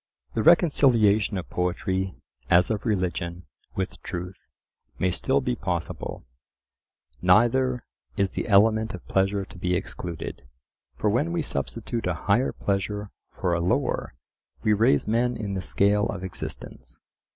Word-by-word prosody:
The - - 0
reconciliation 120 - +4
of 90 - -5
poetry, 95 +1 -1 0.3
as 90 +4 +5
of 110 +2 -2
religion, 90 -3 -2 0.3
with 95 -1 -3
truth, 90 +2 -7 0.5
may 90 - +1
still 135 +9 +1
be 125 -2 -1
possible. 90 - -4 1.0
Neither 120 +6 +3 0.3
is 100 -1 +1
the - - -3
element 110 +2 +4
of - - -13
pleasure 95 +1 +1
to - - -14
be 90 0 0
excluded. 85 -3 -5 0.5
For 105 - +1
when 145 +10 +1
we 170 -2 -1
substitute 115 -5 -3
a 90 - 0
higher 105 +6 +3
pleasure 105 +1 -2 0.2
for 90 - -1
a 85 - +1
lower 90 - 0 0.5
we 105 - +4
raise 105 -9 +3
men 120 +2 +1
in 105 -3 -4
the 95 - -2
scale 100 +3 +2
of 95 -2 -5
existence. 95 - -7
100 Hz, 140 wpm, -26 LUFS, 90-115 Hz, 1.0 s, as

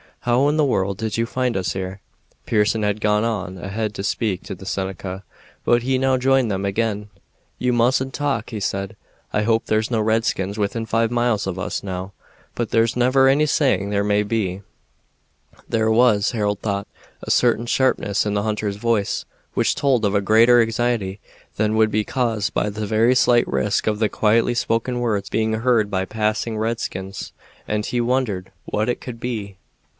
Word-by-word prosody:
How 125 +3 +2
in 150 +1 +1
the 155 - +4
world 100 -7 0
did 110 -1 -3
you 115 - +1
find 125 -1 -1
us 90 -6 -1
here?" 95 +1 -5 0.5
Pearson 110 0 +2
had 105 +1 -1
gone 105 0 +2
on 95 -5 -2
ahead 105 +3 -3
to 95 - -4
speak 100 -2 -1
to 95 - -6
the 95 - -12
Seneca, 95 0 -4 0.4
but 120 0 +3
he 130 +2 +1
now 130 0 +2
joined 130 -1 +2
them 100 -1 -2
again. 105 0 -1 0.5
"You 125 - +1
mustn't 130 +2 +2
talk," 140 -6 -1
he 110 - -4
said. 95 0 -3 0.4
"I 105 - +1
hope 115 +1 +1
there's 110 0 0
no 115 - +1
redskins 110 -3 0
within 110 +2 -2
five 115 0 +1
miles 120 -3 +1
of 95 -1 -3
us - - -3
now, 95 0 -5 0.4
but 120 -2 -2
there's 115 0 +2
never 130 +2 +4
any 140 +3 +4
saying 125 - +1
where 100 0 +1
they - - -2
may 105 0 +3
be." 100 -3 -2 1.1
There 110 -1 +1
was, 110 -3 +4
Harold 105 -3 -1
thought, 100 -2 -2 0.4
a - - -3
certain 120 -1 +3
sharpness 115 -6 +1
in 105 - -1
the 100 - 0
hunter's 105 -2 -2
voice, 110 -2 0 0.3
which - - +2
told 135 -5 +2
of 100 - +1
a 100 - +3
greater 115 +4 +5
anxiety 115 -4 -1 0.4
than 110 +1 +1
would 110 -1 +3
be 110 +1 +1
caused 115 -4 -1
by 105 - +1
the 105 +1 -4
very 115 +4 +3
slight 120 -1 +4
risk 65 -1 0
of 105 -1 +1
the 110 -2 +2
quietly 115 +3 +2
spoken 120 +1 0
words 105 -5 -1
being 110 0 0
heard 110 -2 +2
by 95 -1 0
passing 110 +2 -1
redskins, 100 -4 -4 0.3
and 105 0 -1
he 120 - 0
wondered 120 -7 -1
what 110 +3 -1
it 120 - -2
could 120 -2 -7
be. 105 -6 -4
110 Hz, 185 wpm, -21 LUFS, 100-120 Hz, 1.1 s, greater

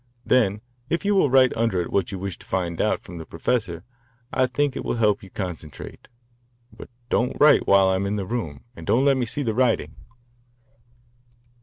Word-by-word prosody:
Then 105 -5 +2 0.3
if 170 +4 -1
you 205 - +3
will 190 -8 +3
write 130 -1 +4
under 115 -5 +1
it 85 - -3
what 100 -1 0
you 95 - -4
wish 95 0 -5
to - - -15
find 85 -3 -2
out - - 0
from 85 -1 -9
the - - -6
professor 85 -1 -2 0.5
I 130 -1 +2
think 135 +2 -1
it - - -4
will - - -2
help 105 -3 +2
you 95 - -12
concentrate. 90 -6 -7 0.7
But - - -11 0.2
don't 125 - +1
write 150 - +5
while 100 -1 +5
I 95 0 +2
am 100 +1 -1
in 100 - -1
the 100 -2 -3
room, 90 - -4
and - - -11
don't 130 +4 +3
let 140 -1 +4
me 125 -2 -1
see 145 +6 -3
the 115 -4 -1
writing." 125 0 +1
105 Hz, 200 wpm, -23 LUFS, 95-130 Hz, 0.7 s, write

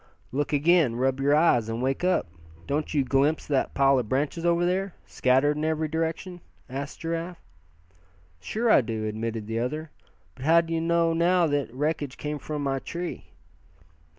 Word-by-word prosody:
"Look 145 +2 -1
again. 150 -3 +3
Rub 130 +2 0
your 140 +2 +3
eyes, 120 -8 +3
and 115 +1 -3
wake 135 +5 -1
up! 185 0 +2 0.4
Don't 150 +2 -2
you 145 -3 +2
glimpse 140 +4 +1
that 140 -3 -1
pile 135 -1 +4
of 115 -4 -4
branches 145 +5 -1
over 170 0 +2
there, 185 +1 -1
scattered 135 +4 +2
in 150 - -2
every 160 0 0
direction?" 165 +3 -3 0.3
asked 140 +2 -6
Giraffe. 165 +1 -4 1.0
"Sure 220 - 0
I - - +7
do," 110 -2 -4
admitted 110 0 -3
the 110 +1 -2
other, 150 +6 -3 0.4
"but 130 - -11
how 165 +2 +6
d'ye 165 0 -2
know 165 0 +2
now 175 +1 +3
that 145 -5 -1
wreckage 145 +1 -2
came 150 0 -4
from 150 -1 -4
my 135 -1 0
tree?" 170 +5 -6
150 Hz, 170 wpm, -26 LUFS, 130-165 Hz, 1.0 s, I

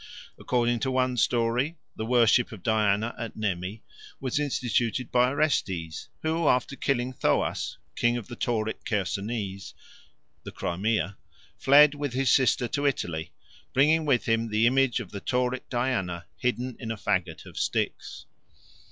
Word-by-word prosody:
According 120 -1 +1
to 130 - -1
one 130 -1 +1
story 120 +7 +1 0.2
the 110 - -4
worship 120 0 +4
of 110 -6 -10
Diana 110 +1 +1
at 115 -1 -5
Nemi 100 0 -3 0.4
was 130 +1 -1
instituted 125 -4 -1
by 125 0 +4
Orestes, 95 - -1 0.2
who, 160 0 +1
after 125 +1 +2
killing 130 -2 -1
Thoas, - - 0 0.2
King 120 0 +2
of 120 - -7
the 120 - -8
Tauric 110 -2 -2
Chersonese 100 0 -3 0.7
(the - - -8
Crimea), 100 +1 -1 0.4
fled 145 +2 +6
with 145 -3 -4
his 130 0 +2
sister 130 -2 +3
to 145 0 0
Italy, 85 - -2 0.4
bringing 155 +4 +4
with 135 -5 +2
him 115 0 +1
the 110 +1 +2
image 130 0 +3
of - - -8
the 100 - -6
Tauric 125 0 -1
Diana 110 -9 -1
hidden 125 0 -2
in 115 - -6
a 110 - -3
faggot 90 -5 -1
of - - -8
sticks. - - -2
120 Hz, 145 wpm, -27 LUFS, 105-130 Hz, 0.7 s, fled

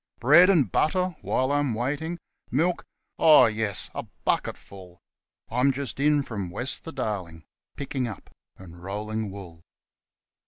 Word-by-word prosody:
Bread 155 - +7
and 150 - +3
butter 180 +2 +1
while 130 +1 0
I'm 145 -5 +1
waiting. 145 +8 -2 0.3
Milk? 170 +7 0 0.4
Oh, 155 -2 +8
yes 110 -2 -2
a - - -3 0.2
bucketful.) 90 -2 -3 0.5
I'm 125 +4 +3
just 135 0 -5
in 145 0 +3
from 100 -8 -5
west 120 +9 -3
the 165 - -6
Darling, 95 - -4
' - - -67
picking 135 -3 -3
up 110 - -9
' - - -45
and 85 -2 -13
'rolling 105 +2 -4
wool.' 90 -4 -10
125 Hz, 145 wpm, -26 LUFS, 100-145 Hz, 0.5 s, Oh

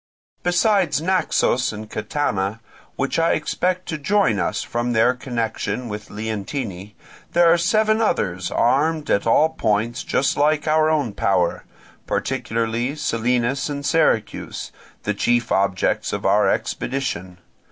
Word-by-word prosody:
Besides 180 -1 +2
Naxos 165 -7 +1
and 110 0 -8
Catana, 105 -7 -2 0.4
which 140 +4 -1
I 165 - +3
expect 180 +4 -1
to 155 - -3
join 170 - +2
us - - -1
from 120 +1 -2
their 115 +3 +4
connection 115 -2 -3
with 105 0 -7
Leontini, 105 -1 -5 0.4
there 170 -1 +6
are - - +3
seven 215 +5 +2
others 95 - 0
armed 150 +5 +1
at 100 - +1
all 155 +7 +4
points 115 -5 -1
just 135 - +1
like 150 +1 +2
our 155 0 +3
own 145 -9 0
power, 90 -4 0 0.4
particularly 115 +4 -1
Selinus 125 -1 0
and 140 -1 -4
Syracuse, 140 -7 0 0.3
the 105 - 0
chief 120 +3 +1
objects 95 -1 +1
of - - -3
our - - +4
expedition. 105 -9 -3
125 Hz, 130 wpm, -21 LUFS, 110-155 Hz, 0.4 s, there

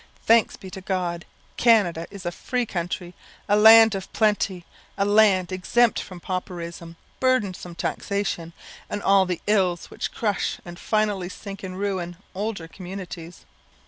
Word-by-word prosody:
Thanks 230 -1 +4
be 190 - -10
to 190 - -8
God! 180 -2 -2 0.3
Canada 200 -8 +3
is 195 -3 -10
a 175 - -1
free 245 +7 -2
country; 175 -2 -4 0.3
a 205 - +4
land 220 +1 +8
of 195 -1 -5
plenty; 205 -5 +1 0.3
a 200 - +2
land 205 -4 +4
exempt 225 +6 +2
from 185 -2 -8
pauperism, 170 -2 -5 0.2
burdensome 200 -9 0
taxation, 195 -3 -2 0.4
and 205 - -4
all 195 -1 +4
the 180 -2 -3
ills 190 -5 +1
which - - -4
crush 205 -4 -1
and 175 0 -9
finally 210 -4 0
sink 195 +1 -9
in 185 -1 -6
ruin 185 -3 -3 0.2
older 200 -3 -4
communities. 180 -1 -9
190 Hz, 145 wpm, -24 LUFS, 175-210 Hz, 0.4 s, land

